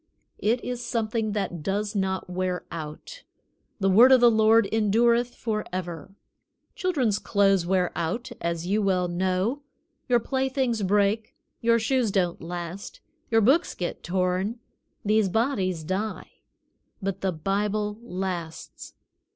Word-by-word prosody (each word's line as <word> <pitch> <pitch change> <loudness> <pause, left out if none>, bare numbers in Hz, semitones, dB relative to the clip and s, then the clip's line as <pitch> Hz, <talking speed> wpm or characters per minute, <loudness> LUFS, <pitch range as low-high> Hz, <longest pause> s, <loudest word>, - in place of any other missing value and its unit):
It 235 +4 +1
is 245 -1 -4
something 225 -2 -1
that 195 -5 -3
does 205 +5 -2
not 190 -1 -1
wear 180 0 -2
out. 165 - -7 0.6
"The 195 - +1
word 230 +7 +7
of 260 - +8
the 240 -1 +6
Lord 220 0 +4
endureth 235 +3 +2
forever." 185 -5 -4 0.6
Children's 265 - 0
clothes 195 -4 +2
wear 185 -1 +1
out, 175 +9 -3
as 170 0 -2
you 205 +4 +1
well 185 -3 +1
know. 185 +9 -1 0.5
Your 240 -1 +5
play 265 +3 -1
things 255 -4 0
break; 210 +6 +1 0.2
your 230 0 +3
shoes 235 0 +1
don't 180 -3 0
last; 175 +3 -6 0.3
your 225 -1 +4
books 280 - +3
get 175 - -4
torn; 185 +5 -1 0.5
these 210 -1 +3
bodies 190 - 0
die; 190 +6 -3 0.7
but 195 -2 -3
the 190 - +1
Bible 205 +5 -1
lasts. 180 -6 -6
205 Hz, 130 wpm, -26 LUFS, 185-230 Hz, 0.7 s, of